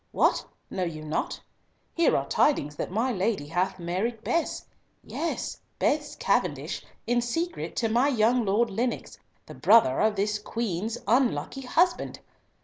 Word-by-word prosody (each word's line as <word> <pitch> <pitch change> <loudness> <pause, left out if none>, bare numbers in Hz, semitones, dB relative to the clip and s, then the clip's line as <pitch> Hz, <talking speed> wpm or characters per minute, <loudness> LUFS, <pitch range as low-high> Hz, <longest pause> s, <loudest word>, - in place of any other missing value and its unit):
—What! - - +3 0.3
know 185 - -3
you 160 -3 -4
not? 155 +1 -2 0.5
Here 335 - +3
are - - -2
tidings 150 - +2
that - - -3
my 225 +7 0
lady 195 -6 0
hath 175 +5 -1
married 190 +7 -2
Bess—yes, 335 0 -3 0.2
Bess 295 0 0
Cavendish, - - 0 0.2
in 240 +1 +2
secret 330 +9 -3
to 230 - +1
my 240 +5 +3
young 240 -2 +3
Lord 215 +3 +2
Lennox, 235 +5 -2 0.3
the - - -10
brother 220 - +5
of 215 -1 +3
this 210 +1 0
Queen's 220 0 -3
unlucky 260 +2 +1
husband! 345 +8 +1
225 Hz, 140 wpm, -27 LUFS, 195-250 Hz, 0.5 s, brother